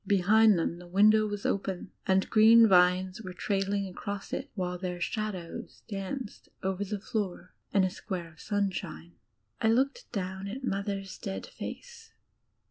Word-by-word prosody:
Behind 205 +2 +5
them 170 +1 -1
the 180 - -12
window 215 +4 +5
was 205 -1 -5
open, 190 -2 -2 0.2
and 190 0 +3
green 225 +1 +7
vines 185 +1 +4
were 185 -4 -7
trailing 195 +1 -1
across 200 +2 -6
it, 275 - -3
while 180 -2 -2
their 180 -1 -4
shadows 185 -2 -4
danced 205 +4 -5
over 190 +1 -1
the 205 +1 -4
floor 195 -5 -4 0.2
in 195 - +4
a 185 - +2
square 180 -4 -5
of 155 - -16
sunshine. 190 -5 -3 0.5
I - - +3
looked 275 - +1
down 190 -2 -4
at 250 +7 -6
Mother's 195 -3 -3
dead 195 -2 -5
face. 470 -2 -9
195 Hz, 150 wpm, -29 LUFS, 185-215 Hz, 0.5 s, green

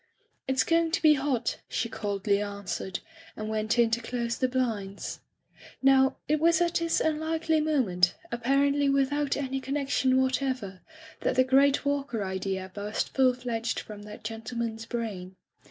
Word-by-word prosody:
"It's 265 0 +2
going 330 0 +2
to - - +1
be 310 -1 +8
hot,*' 270 -5 -1
she 230 - -1
coldly 205 -2 -1
an 200 -1 -5
swered, 185 0 -4 0.4
and 215 0 -4
went 220 +1 0
in 235 -1 +4
to 235 +1 +1
close 235 0 -2
the 255 - +1
blinds. 225 -6 -2 0.6
Now, 265 0 +4
it 305 +1 +2
was 335 +2 +4
at 345 -1 +1
this 335 -1 +1
unlikely 315 0 +1
moment, 215 - +2 0.2
ap 235 0 -4
parently 280 +1 +3
without 275 +1 +1
any 270 -1 -2
connection 270 -1 +1
whatever, 260 -7 -1 0.4
that - - 0
the 255 - +5
great 275 +2 +3
Walker 280 -6 -1
idea 190 0 -3
burst 205 +1 -3
full 255 -2 +4
fledged 235 -2 -2
from 210 -1 -9
that 210 0 -10
gentleman's 225 0 -4
brain. 200 -7 -4
250 Hz, 155 wpm, -28 LUFS, 215-280 Hz, 0.6 s, be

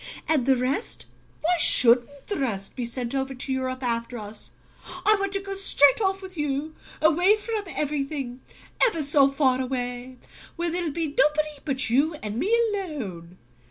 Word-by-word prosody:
"And 290 -6 +2
the 265 - +5
rest 260 - -1 0.4
why 345 +3 +2
shouldn't 250 +3 +4
the 410 - -3
rest 200 -8 -2
be 245 - -3
sent 235 +1 -2
over 270 0 -2
to 265 +1 -1
Europe 260 0 -3
after 235 0 -2
us? 210 -1 -5 0.5
I 430 - +7
want 395 -1 -2
to 395 - +2
go 390 0 -6
straight 385 -4 +4
off 385 -1 0
with 375 -1 -9
you, 295 0 -3 0.3
away 355 +6 +5
from 435 -1 -4
everything 275 -5 -3 0.4
ever 335 -11 +3
so 280 -1 +5
far 265 -2 +1
away, 250 0 -4 0.4
where 340 0 -1
there'll 345 -1 -1
be 320 +1 -3
nobody 300 -1 +1
but 265 -5 0
you 295 +6 +2
and 210 +1 -4
me 400 - -1 0.2
alone!" 205 - -6
275 Hz, 165 wpm, -25 LUFS, 250-335 Hz, 0.5 s, I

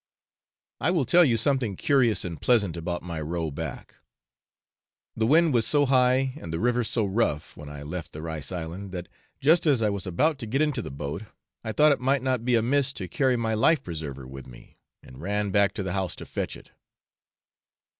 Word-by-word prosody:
I - - +1
will 170 -7 +1
tell 175 +5 +6
you 120 -7 +3
something 120 -4 +1
curious 125 -3 +2
and 85 -4 -6
pleasant 105 -9 +2
about 85 +1 -4
my 85 -3 -5
row 80 0 -3
back. - - -7 1.2
The 110 0 +1
wind 160 +2 +4
was 115 -3 +2
so 145 -1 +3
high 130 0 +3
and 85 - -7
the 80 - -2
river 120 +3 +1
so 110 0 0
rough 95 -7 -1
when 75 0 -10
I 75 -1 -8
left 85 +3 -6
the 75 - -8
rice 80 -3 -5
island, 90 +3 -6
that 90 -1 -5 0.3
just 160 +4 +4
as 140 -5 +4
I 105 -2 +1
was 100 -1 -4
about 145 - +1
to 115 - -5
get 130 +6 -1
into 150 -3 0
the - - -7
boat 70 +5 -5 0.4
I 110 - -3
thought 150 +6 +5
it 140 - +1
might 135 +1 +1
not 130 -3 0
be 125 0 +2
amiss 135 +4 +2
to - - -6
carry 135 -7 +1
my 115 -2 -1
life 135 +7 +3
preserver 75 -6 -6
with 65 0 -10
me, - - -16 0.2
and 65 +2 -13
ran 100 +2 -1
back 100 0 +4
to 100 - -3
the 95 -1 -3
house 95 -2 -2
to - - -9
fetch - - -4
it. - - -18
110 Hz, 205 wpm, -26 LUFS, 85-130 Hz, 1.2 s, tell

